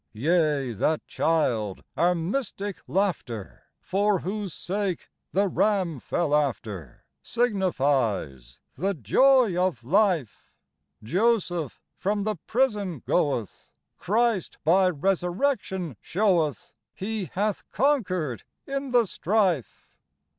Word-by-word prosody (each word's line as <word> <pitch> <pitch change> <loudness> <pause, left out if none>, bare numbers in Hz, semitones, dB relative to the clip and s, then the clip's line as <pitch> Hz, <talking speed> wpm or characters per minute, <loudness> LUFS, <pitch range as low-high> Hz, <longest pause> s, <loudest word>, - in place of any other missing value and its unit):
Yea, 150 0 +1
that 155 +9 0
child, 120 - 0
our 175 +1 +3
mystic 200 +2 -3
Laughter, 170 - -2
For 200 0 +1
whose 200 0 -3
sake 190 +1 -3 0.2
the 200 +2 +2
ram 190 -6 +1
fell 150 +4 -1
after, 110 - -2 0.2
Signifies 135 - 0
the 195 +6 -1
Joy 240 - +4
of 180 -9 0
Life. 175 - +1 0.5
Joseph 175 - 0 0.2
from 205 +1 0
the 215 -1 -1
prison 210 - 0
goeth: 140 - -1 0.3
Christ, 220 -2 0
by 185 +4 +4
resurrection, 185 - -1
showeth 165 - 0 0.2
He 210 0 -3
hath 205 +1 -1
conquered 185 - 0 0.2
in 275 0 -3
the 245 -2 +4
strife. 185 - 0
180 Hz, 95 wpm, -26 LUFS, 145-205 Hz, 0.5 s, Joy